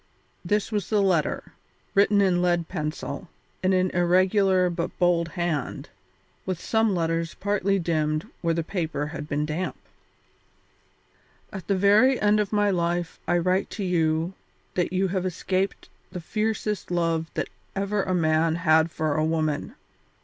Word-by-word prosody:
This 210 +1 0
was 205 -4 -2
the 215 - +2
letter, 185 -6 +1 0.4
written 200 +1 +4
in 180 -3 +3
lead 175 -2 +1
pencil, 160 +2 -4 0.3
in 185 - +2
an 185 -1 +2
irregular 185 +1 +3
but 170 -1 -3
bold 175 -1 +2
hand, 170 -5 -2 0.5
with 185 -3 -3
some 220 -1 +1
letters 165 -1 -1
partly 200 -1 0
dimmed 155 -3 0 0.2
where 165 -1 +1
the 165 - -1
paper 160 -5 -2
had 150 0 -7
been 150 +1 0
damp: 160 +5 -3 1.8
"At 190 -4 -7
the 195 - +1
very 210 +7 +5
end 210 0 +3
of 205 -2 -1
my 205 -1 +2
life 175 -1 -1
I 175 - +3
write 185 +3 +1
to 205 - -2
you 165 -1 +1 0.4
that 180 -1 0
you 190 +1 +1
have 185 0 -1
escaped 185 +1 -2 0.2
the 180 - -5
fiercest 215 +2 -2
love 165 -2 0
that - - -2 0.3
ever 200 +1 0
a 185 -1 -1
man 160 -1 +2
had 160 -1 +3
for 155 -2 -1
a 155 - +1
woman. 155 -2 -1
175 Hz, 150 wpm, -25 LUFS, 165-195 Hz, 1.8 s, very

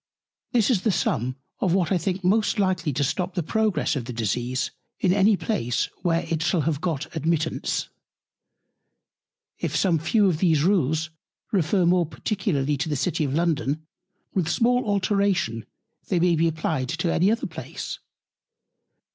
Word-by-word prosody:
This 235 0 +3
is 210 -7 +2
the 220 - +2
Sum 130 - 0 0.2
of 180 -2 +2
what 185 -2 +1
I 185 - +3
think 185 +3 -2
most 215 +5 +2
likely 185 -5 +1
to 145 +2 0
stop 180 +6 -2
the 175 - 0
Progress 215 +1 +1
of 130 -4 -3
the 125 - -6
Disease 120 +3 -1 0.3
in 180 -2 +3
any 200 +1 +4
Place, 125 - -1
where 170 -2 +1
it 165 -1 -1
shall 175 0 +2
have 150 -1 -1
got 165 -6 -3
Admittance. 160 0 -1 1.7
If - - -2
some 175 -5 +2
few 200 +6 +3
of 165 -5 +1
these 160 -5 +3
Rules 165 -3 +1 0.4
refer 180 -1 +2
more 175 -1 +3
particularly 155 -7 -1
to 155 +4 -2
the 150 - 0
City 165 +4 0
of 135 0 -2
London, 155 -2 0 0.5
with 175 -4 0
small 245 +1 +2
Alteration 195 - 0 0.4
they 180 - +1
may 175 0 +3
be 165 +1 +2
applied 155 -4 -1
to 165 +1 0
any 185 +4 +3
other 225 +2 0
Place. - - -6
170 Hz, 160 wpm, -25 LUFS, 150-190 Hz, 1.7 s, any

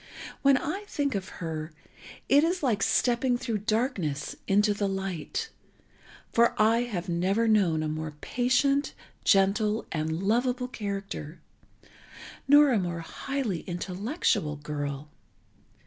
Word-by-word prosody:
When 275 -1 +5
I 390 +10 -3
think 285 -8 -1
of 190 -2 -3 0.2
her, 155 0 -5 0.5
it 285 +2 +5
is 350 +1 0
like 225 -7 +1
stepping 245 +3 +2
through 230 -3 -2
darkness 210 - -1
into 205 +2 +3
the 205 0 -1
light, 195 - -3 0.8
for 235 0 +3
I 225 +2 +4
have 190 -7 -4
never 190 +6 +1
known 185 -8 +3
a - - -1
more 155 0 -4
patient, 265 - +1 0.3
gentle 210 +2 +3
and 160 +2 -2
lovable 250 +4 +1
character, 195 -8 -5 1.1
nor 290 0 +7
a 230 - +3
more 175 -2 -3
highly 240 +1 -3
intellectual 185 - -1
girl. 145 -1 -5
205 Hz, 120 wpm, -28 LUFS, 170-250 Hz, 1.1 s, nor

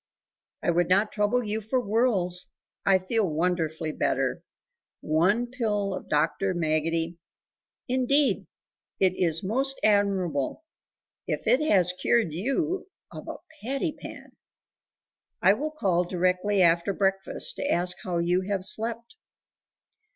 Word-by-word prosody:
"I - - +2
would 175 0 +1
not 200 +4 +3
trouble 210 +4 +1
you 215 0 -3
for 220 +5 0
worlds; 205 -6 +1 0.4
I 195 -1 +6
feel 210 +4 -1
wonderfully 160 -1 -1
better. - - -1 0.6
One 185 +10 +2
pill 215 -5 -2
of - - -7
Dr. 160 +5 +1
Maggotty 165 +1 -1 0.3
" - - -68
"Indeed 260 +3 +2 0.5
it 185 -2 +3
is 165 -2 0
most 270 +7 -1
admirable, 200 - +1 0.6
if - - -3
it 260 - +4
has 180 -3 +4
cured 185 -1 +1
you 310 - -1 0.2
of - - -9
a - - -5 0.3
patty 275 +7 -2
pan! - - -11 1.1
I 190 +2 +5
will 295 +8 -3
call 190 - +1
directly 185 +2 +1
after 170 +3 +3
breakfast 195 - -1
to 285 - -2
ask 180 +1 +1
how 180 -2 -2
you 175 +2 +1
have 195 -2 -1
slept." 230 +3 -3
195 Hz, 130 wpm, -26 LUFS, 175-230 Hz, 1.1 s, I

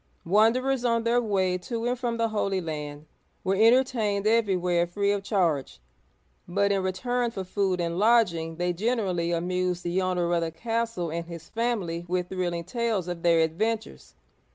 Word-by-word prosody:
Wanderers 235 +7 +3
on 230 -1 +1
their 235 +1 +2
way 190 -5 0
to 230 +5 -4
and 245 0 -1
from 240 -2 -2
the 230 0 +1
Holy 200 -3 0
Land, 150 -3 -6 0.4
were 190 - +1
entertained 220 -2 +3
everywhere 180 -6 +2
free 200 +3 0
of 205 -1 0
charge; 170 - 0 0.7
but 200 +3 +1
in 195 -1 +1
return 240 +7 -1
for 195 -4 -5
food 190 -1 -1
and 170 +1 -1
lodging 190 -8 +3
they 175 +1 -1
generally 185 -4 0
amused 180 +1 -1
the 175 +2 0
owner 180 -2 0
of 170 - +2
the 165 - -1
castle 225 -1 -2
and 170 +1 -3
his 170 -2 -9
family 210 -8 -2
with 180 0 -1
thrilling 175 -2 -2
tales 225 -2 -1
of 175 -1 -4
their 170 -1 +4
adventures. 160 - -2
190 Hz, 165 wpm, -26 LUFS, 175-230 Hz, 0.7 s, their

